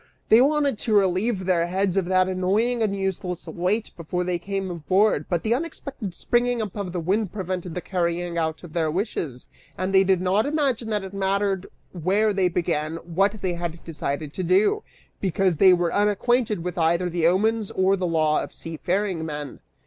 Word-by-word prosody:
They 225 Hz, +2 st, +7 dB
wanted 285 Hz, -4 st, +2 dB
to 220 Hz, -, 0 dB
relieve 190 Hz, +1 st, +2 dB
their 175 Hz, -2 st, +2 dB
heads 190 Hz, +1 st, 0 dB
of 195 Hz, -2 st, +1 dB
that 185 Hz, 0 st, +3 dB
annoying 200 Hz, +6 st, +1 dB
and 205 Hz, -3 st, +1 dB
useless 190 Hz, -2 st, -3 dB
weight 195 Hz, +6 st, -1 dB
before 175 Hz, +2 st, -3 dB
they 180 Hz, -1 st, -1 dB
came 195 Hz, +1 st, -3 dB
aboard, 185 Hz, +6 st, +1 dB
but 175 Hz, -2 st, 0 dB
the 225 Hz, -, +2 dB
unexpected 270 Hz, -, -5 dB
springing 245 Hz, +3 st, +1 dB
up 215 Hz, -4 st, -4 dB
of 200 Hz, -4 st, -4 dB
the 180 Hz, -, -3 dB
wind 190 Hz, +3 st, 0 dB
prevented 185 Hz, -3 st, -4 dB
the 180 Hz, -, -3 dB
carrying 175 Hz, -1 st, -2 dB
out 160 Hz, 0 st, -2 dB
of 170 Hz, -3 st, -11 dB
their 160 Hz, -2 st, +1 dB
wishes, 155 Hz, -, -3 dB, 0.3 s
and 185 Hz, +1 st, -2 dB
they 190 Hz, 0 st, +6 dB
did 190 Hz, -1 st, +2 dB
not 190 Hz, +7 st, +1 dB
imagine 275 Hz, -7 st, 0 dB
that 210 Hz, -2 st, 0 dB
it 190 Hz, 0 st, -8 dB
mattered 195 Hz, 0 st, 0 dB, 0.2 s
where 195 Hz, +5 st, +1 dB
they 190 Hz, -2 st, +2 dB
began 165 Hz, -3 st, -1 dB
what 195 Hz, +5 st, -1 dB
they 185 Hz, -2 st, 0 dB
had 170 Hz, -1 st, -5 dB
decided 150 Hz, -2 st, -4 dB
to -, -, -4 dB
do, 195 Hz, -, +3 dB, 0.4 s
because 185 Hz, -3 st, +1 dB
they 190 Hz, -1 st, +8 dB
were 175 Hz, -1 st, +2 dB
unacquainted 210 Hz, 0 st, +1 dB
with 180 Hz, 0 st, -4 dB
either 170 Hz, +2 st, +2 dB
the 170 Hz, -1 st, +1 dB
omens 215 Hz, +4 st, +1 dB
or 190 Hz, +1 st, +2 dB
the 185 Hz, -2 st, -2 dB
law 155 Hz, -2 st, +2 dB
of -, -, -7 dB
seafaring 175 Hz, +2 st, -2 dB
men." 150 Hz, -3 st, -6 dB
185 Hz, 185 wpm, -24 LUFS, 170-205 Hz, 0.4 s, they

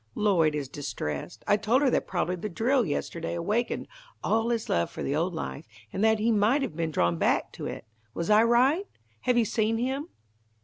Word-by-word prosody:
Lloyd 170 Hz, -8 st, +3 dB
is 145 Hz, -3 st, -3 dB
distressed. 75 Hz, -, -5 dB
I 205 Hz, -, +4 dB
told 225 Hz, +7 st, +2 dB
her 265 Hz, -, +3 dB
that -, -, 0 dB
probably 180 Hz, -, -1 dB
the 195 Hz, +4 st, -5 dB
drill 235 Hz, +4 st, +1 dB
yesterday 165 Hz, +3 st, -3 dB
awakened 210 Hz, +8 st, -1 dB, 0.4 s
all 225 Hz, +1 st, +1 dB
his 230 Hz, -2 st, -1 dB
love 85 Hz, 0 st, +1 dB
for -, -, -6 dB
the 140 Hz, -, -1 dB
old 170 Hz, +3 st, 0 dB
life, 160 Hz, -1 st, -5 dB, 0.3 s
and 195 Hz, -, -1 dB
that 220 Hz, 0 st, +4 dB
he 225 Hz, +2 st, +1 dB
might 225 Hz, +7 st, +3 dB
have 165 Hz, -, -4 dB
been 165 Hz, -1 st, -1 dB
drawn 85 Hz, -, +1 dB
back -, -, +1 dB
to -, -, -6 dB
it. -, -, -6 dB, 0.3 s
Was 170 Hz, -, -2 dB
I 210 Hz, +1 st, +7 dB
right? 255 Hz, -, +3 dB, 0.3 s
Have 250 Hz, -1 st, +1 dB
you 235 Hz, -, +4 dB
seen 220 Hz, +1 st, +1 dB
him?" 265 Hz, +6 st, -2 dB
210 Hz, 205 wpm, -27 LUFS, 165-235 Hz, 0.4 s, I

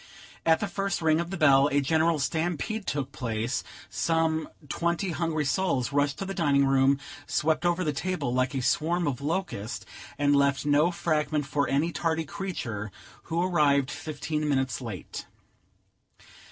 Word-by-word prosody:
At 160 Hz, -1 st, +5 dB
the 205 Hz, -, 0 dB
first 195 Hz, 0 st, -2 dB
ring 160 Hz, -1 st, +3 dB
of 170 Hz, 0 st, -2 dB
the 195 Hz, -, -4 dB
bell, 140 Hz, -3 st, +6 dB
a 140 Hz, -, +3 dB
general 160 Hz, +3 st, +2 dB
stampede 175 Hz, -, -2 dB
took 140 Hz, -2 st, -2 dB
place; 115 Hz, 0 st, -2 dB, 0.2 s
some 160 Hz, -1 st, 0 dB, 0.2 s
twenty 170 Hz, +5 st, -1 dB
hungry 160 Hz, -2 st, -1 dB
souls 140 Hz, -5 st, 0 dB
rushed 145 Hz, -1 st, +1 dB
to 195 Hz, -, -4 dB
the 195 Hz, -, -4 dB
dining 145 Hz, -6 st, +3 dB
room, 135 Hz, 0 st, +4 dB, 0.3 s
swept 160 Hz, +3 st, +1 dB
over 175 Hz, +1 st, +1 dB
the 150 Hz, -3 st, 0 dB
table 180 Hz, -5 st, -2 dB
like 130 Hz, +1 st, +1 dB
a 130 Hz, -, -1 dB
swarm 165 Hz, +7 st, +1 dB
of 140 Hz, -2 st, -2 dB
locusts, 145 Hz, -, -3 dB, 0.3 s
and 145 Hz, 0 st, +3 dB
left 140 Hz, 0 st, +2 dB
no 150 Hz, +3 st, +4 dB
fragment 155 Hz, -3 st, 0 dB
for 145 Hz, +1 st, 0 dB
any 150 Hz, +5 st, +1 dB
tardy 165 Hz, -1 st, -1 dB
creature 125 Hz, -, -4 dB, 0.3 s
who 170 Hz, +1 st, 0 dB
arrived 145 Hz, -7 st, +3 dB
fifteen 150 Hz, +1 st, -3 dB
minutes 130 Hz, -3 st, 0 dB
late. 110 Hz, -7 st, -7 dB
150 Hz, 155 wpm, -27 LUFS, 140-170 Hz, 0.3 s, bell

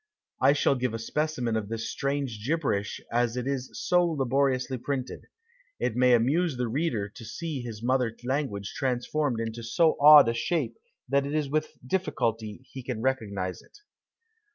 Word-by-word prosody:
I 140 Hz, -, +6 dB
shall 145 Hz, -, +3 dB
give 125 Hz, -3 st, -1 dB
a -, -, -1 dB
specimen 125 Hz, -1 st, -1 dB
of 105 Hz, -2 st, -2 dB
this 115 Hz, 0 st, -3 dB
strange 140 Hz, -6 st, -2 dB
gibberish 130 Hz, -8 st, -1 dB
as 120 Hz, 0 st, +1 dB
it 125 Hz, -, -2 dB
is 135 Hz, -2 st, -2 dB
so 180 Hz, 0 st, +2 dB
laboriously 135 Hz, -4 st, 0 dB
printed. 130 Hz, 0 st, -4 dB, 0.5 s
It 115 Hz, -, -1 dB
may 125 Hz, 0 st, +5 dB
amuse 140 Hz, +6 st, +1 dB
the 125 Hz, -1 st, -1 dB
reader 120 Hz, -5 st, -1 dB
to 110 Hz, -, -12 dB
see 140 Hz, +5 st, -5 dB
his 115 Hz, -2 st, -7 dB
mother 125 Hz, -2 st, +1 dB
language 125 Hz, -7 st, -2 dB
transformed 130 Hz, 0 st, -1 dB
into 115 Hz, +1 st, -4 dB
so 155 Hz, +8 st, +2 dB
odd 150 Hz, -3 st, +10 dB
a 115 Hz, -, +2 dB
shape 120 Hz, -1 st, -1 dB, 0.3 s
that 140 Hz, +2 st, +1 dB
it 145 Hz, -, -3 dB
is 150 Hz, -3 st, -1 dB
with 155 Hz, +1 st, -1 dB
difficulty 115 Hz, -, -2 dB
he 130 Hz, -, -7 dB
can 125 Hz, -2 st, -4 dB
recognise 100 Hz, -8 st, -2 dB
it. -, -, -20 dB
125 Hz, 165 wpm, -27 LUFS, 115-145 Hz, 0.5 s, odd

